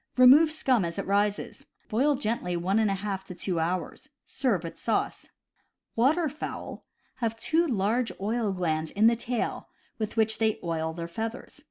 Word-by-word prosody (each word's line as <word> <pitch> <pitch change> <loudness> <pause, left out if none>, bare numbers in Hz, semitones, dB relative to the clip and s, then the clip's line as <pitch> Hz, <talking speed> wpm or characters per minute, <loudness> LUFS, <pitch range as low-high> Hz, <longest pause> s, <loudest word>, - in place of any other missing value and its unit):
Remove 270 +6 +8
scum 265 -8 +1
as 170 -1 -4
it - - -2
rises. 205 +1 -1 0.2
Boil 265 +6 +2
gently 215 -8 -2
one 190 +5 +1
and 220 - +3
one 195 - 0
half 195 -1 -3
to 180 - -9
two 175 -1 -2
hours. 175 - -3 0.2
Serve 240 -10 0
with 165 - -7
sauce. - - -1 0.7
Waterfowl 300 +5 -1 0.3
have 225 -2 -2
two 325 +8 +1
large 230 0 0
oil 215 +1 0
glands 160 -4 -1
in 205 +6 +2
the 230 +1 +6
tail, 235 +1 -3 0.3
with 215 +1 -3
which 220 0 +2
they 220 -1 +2
oil 160 -1 -1
their 170 +1 -5
feathers. 225 +10 -6
220 Hz, 165 wpm, -27 LUFS, 180-245 Hz, 0.7 s, Remove